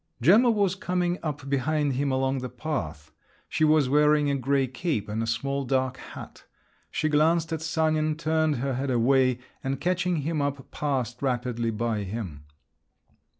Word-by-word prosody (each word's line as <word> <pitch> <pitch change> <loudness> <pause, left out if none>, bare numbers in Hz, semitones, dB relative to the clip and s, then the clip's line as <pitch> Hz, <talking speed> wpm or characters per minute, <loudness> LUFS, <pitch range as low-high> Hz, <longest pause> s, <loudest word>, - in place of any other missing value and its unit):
Gemma 205 - +6
was 200 -5 +2
coming 180 -1 -1
up 145 -3 -4
behind 140 +1 0
him 140 +2 0
along 130 0 0
the 125 0 -5
path. 80 - -5 0.4
She 155 - -1
was 155 -3 +4
wearing 150 +1 +3
a - - +1
grey 135 +1 +1
cape 130 - -2
and 105 +2 -2
a 115 - -2
small 140 +4 -1
dark 130 0 0
hat. - - -11 0.5
She 155 - -1
glanced 160 +2 +2
at 160 - -3
Sanin, 155 -1 +1
turned 155 -1 +1
her 135 +2 -2
head 135 +2 -2
away, 130 +1 +3 0.3
and 135 +1 -2
catching 180 0 0
him 155 0 -1
up, 140 -2 -3
passed 130 -5 -2
rapidly 120 -3 -1
by 110 -1 -1
him. 95 -8 -6
140 Hz, 160 wpm, -26 LUFS, 125-155 Hz, 0.5 s, Gemma